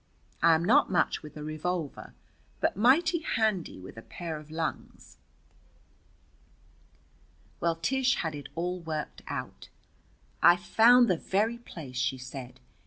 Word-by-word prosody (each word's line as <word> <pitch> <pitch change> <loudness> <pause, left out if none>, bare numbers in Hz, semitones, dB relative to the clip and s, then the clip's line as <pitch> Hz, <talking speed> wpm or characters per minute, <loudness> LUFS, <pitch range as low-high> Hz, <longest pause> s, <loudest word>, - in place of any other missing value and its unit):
I 165 -1 +6
am 165 +2 -1
not 220 - +4
much 180 - +1
with 150 -1 -11
a 150 - -6
revolver, 155 0 -4 0.4
but - - +1
mighty 295 - +4
handy 220 - -1
with 95 +4 -11
a - - -7
pair 165 +5 -6
of 150 0 -14
lungs. 160 0 -5 2.4
Well, 170 -1 +1
Tish 260 +10 +1
had 160 -2 -2
it 145 -2 -8
all 180 +2 -2
worked 160 -3 -5
out. - - -6 0.7
"I've 175 0 +6
found 240 +5 +6
the 180 - +2
very 220 +7 0
place," 150 - -9
she 130 +1 0
said. 130 0 -9
170 Hz, 135 wpm, -29 LUFS, 150-220 Hz, 2.4 s, I